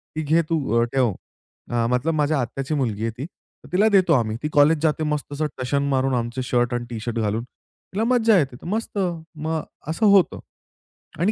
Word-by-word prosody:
की 155 Hz, -, -1 dB
"घे 155 Hz, +3 st, +3 dB
तू 165 Hz, -, +2 dB, 0.2 s
अ, 115 Hz, -, +4 dB
ठेव." 125 Hz, -5 st, +3 dB, 0.6 s
अ, 120 Hz, -1 st, +1 dB
मतलब 130 Hz, +7 st, +1 dB
माझ्या 150 Hz, -1 st, +1 dB
आत्याची 130 Hz, +4 st, -4 dB
मुलगी 115 Hz, -7 st, -1 dB
आहे 115 Hz, -, 0 dB
ती, 135 Hz, -, -4 dB
तर 175 Hz, -, -19 dB
तिला 205 Hz, +4 st, +4 dB
देतो 185 Hz, -5 st, +4 dB
आम्ही. 115 Hz, -5 st, +1 dB
ती 150 Hz, -, -1 dB
कॉलेज 150 Hz, +2 st, +5 dB
जाते 155 Hz, 0 st, +1 dB
मस्त 150 Hz, -1 st, -2 dB
असं 155 Hz, +2 st, -1 dB, 0.2 s
टशन 140 Hz, +2 st, 0 dB
मारून 135 Hz, -1 st, +1 dB
आमचे 120 Hz, +1 st, -2 dB
शर्ट 120 Hz, -1 st, +1 dB
अन् 120 Hz, 0 st, -2 dB
टी 115 Hz, -2 st, -5 dB
शर्ट 115 Hz, +1 st, -3 dB
घालून. 110 Hz, +2 st, -1 dB
तिला 195 Hz, -, -8 dB
मज्जा 230 Hz, -3 st, +4 dB
येते 135 Hz, -5 st, -1 dB
तर -, -, -12 dB
मस्त, 215 Hz, +2 st, -3 dB, 0.4 s
मग 160 Hz, +1 st, -2 dB, 0.3 s
असं 165 Hz, +8 st, 0 dB
होतं 200 Hz, -3 st, +4 dB, 0.8 s
आणि 195 Hz, +5 st, +2 dB
145 Hz, 200 wpm, -23 LUFS, 120-165 Hz, 0.8 s, कॉलेज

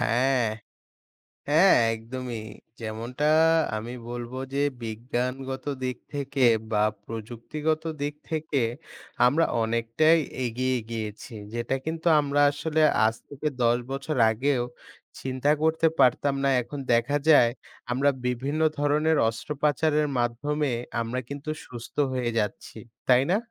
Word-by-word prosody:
হ্যাঁ। 125 Hz, +1 st, +2 dB, 1.1 s
হ্যাঁ, 165 Hz, +6 st, +6 dB, 0.2 s
একদমই 120 Hz, +1 st, -6 dB, 0.4 s
যেমনটা 115 Hz, +5 st, -4 dB, 0.5 s
আমি 115 Hz, +3 st, -6 dB, 0.2 s
বলব 120 Hz, 0 st, -5 dB, 0.2 s
যে -, -, -1 dB, 0.3 s
বিজ্ঞানগত 125 Hz, +4 st, -3 dB, 0.2 s
দিক 130 Hz, -1 st, -2 dB, 0.2 s
থেকে 140 Hz, -1 st, -1 dB, 0.3 s
বা 105 Hz, -1 st, +3 dB, 0.2 s
প্রযুক্তিগত 120 Hz, +8 st, -3 dB, 0.2 s
দিক 145 Hz, +1 st, -1 dB, 0.2 s
থেকে 155 Hz, -3 st, -1 dB, 0.6 s
আমরা 150 Hz, +7 st, +4 dB, 0.2 s
অনেকটাই 115 Hz, +8 st, +3 dB, 0.3 s
এগিয়ে 130 Hz, +2 st, 0 dB
গিয়েছি। 110 Hz, +1 st, -5 dB, 0.2 s
যেটা 120 Hz, +2 st, -1 dB
কিন্তু 165 Hz, +1 st, -3 dB
আমরা 145 Hz, 0 st, +1 dB
আসলে 155 Hz, +2 st, -1 dB, 0.2 s
আজ 110 Hz, -, +2 dB
থেকে 145 Hz, +1 st, -4 dB, 0.2 s
১০ 120 Hz, +1 st, +4 dB
বছর 140 Hz, +3 st, -3 dB, 0.2 s
আগেও 125 Hz, +2 st, 0 dB, 0.6 s
চিন্তা 130 Hz, +2 st, 0 dB
করতে 160 Hz, +1 st, +3 dB
পারতাম 135 Hz, +3 st, +4 dB
না 140 Hz, -, +3 dB
এখন 140 Hz, +4 st, -7 dB
দেখা 120 Hz, +5 st, +2 dB
যায় 135 Hz, -6 st, +7 dB, 0.4 s
আমরা 135 Hz, +3 st, +3 dB, 0.2 s
বিভিন্ন 135 Hz, +5 st, -1 dB, 0.2 s
ধরনের 150 Hz, +2 st, +2 dB
অস্ত্রোপচারের 150 Hz, +4 st, 0 dB
মাধ্যমে 140 Hz, +5 st, 0 dB, 0.3 s
আমরা 115 Hz, +3 st, -2 dB
কিন্তু 140 Hz, +2 st, -6 dB, 0.2 s
সুস্থ 120 Hz, -2 st, -10 dB, 0.2 s
হয়ে 125 Hz, -2 st, -1 dB
যাচ্ছি 105 Hz, +1 st, -4 dB, 0.3 s
তাই 125 Hz, +1 st, +6 dB
না? 195 Hz, -, +4 dB
130 Hz, 115 wpm, -26 LUFS, 120-145 Hz, 1.1 s, যায়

